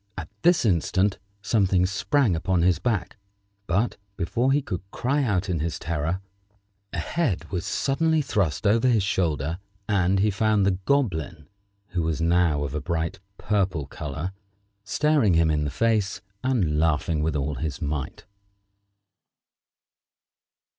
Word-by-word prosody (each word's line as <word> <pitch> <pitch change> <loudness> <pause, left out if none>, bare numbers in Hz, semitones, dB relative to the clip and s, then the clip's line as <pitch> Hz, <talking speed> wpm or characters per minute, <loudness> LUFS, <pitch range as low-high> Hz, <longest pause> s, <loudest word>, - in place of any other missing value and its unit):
At 80 -3 -6
this 175 -3 +4
instant 95 +1 +1 0.2
something 95 -3 +2
sprang 100 - +1
upon 85 +1 +1
his 90 -2 +3
back; 100 -6 -1 0.5
but, 100 +8 0 0.2
before 120 +9 +1
he 140 - +4
could 90 - -4
cry 135 +8 0
out 100 -8 0
in 85 -3 -1
his 80 +2 -2
terror, 85 +3 -2 0.7
a - - -5
head 110 - -1
was 90 -4 -2
suddenly 160 +3 +1
thrust 100 - -1
over 115 +5 +4
his 115 -5 +3
shoulder, 80 -4 0 0.3
and 95 -2 +2
he 105 +2 +3
found 105 0 +2
the 95 -2 +1
Goblin, 90 - 0 0.4
who 90 - -1
was 80 -1 -1
now 85 -3 +2
of 70 -1 -4
a 75 - -2
bright 85 +4 -2 0.2
purple 95 -7 0
color, 75 +4 -5 0.5
staring 140 - +2
him 80 -1 +4
in 75 -1 0
the - - -1
face 105 - 0 0.2
and 100 -13 +1
laughing 80 0 +1
with 80 -1 0
all 75 +1 -1
his 70 0 -4
might. 75 -2 -4
90 Hz, 140 wpm, -25 LUFS, 80-110 Hz, 0.7 s, this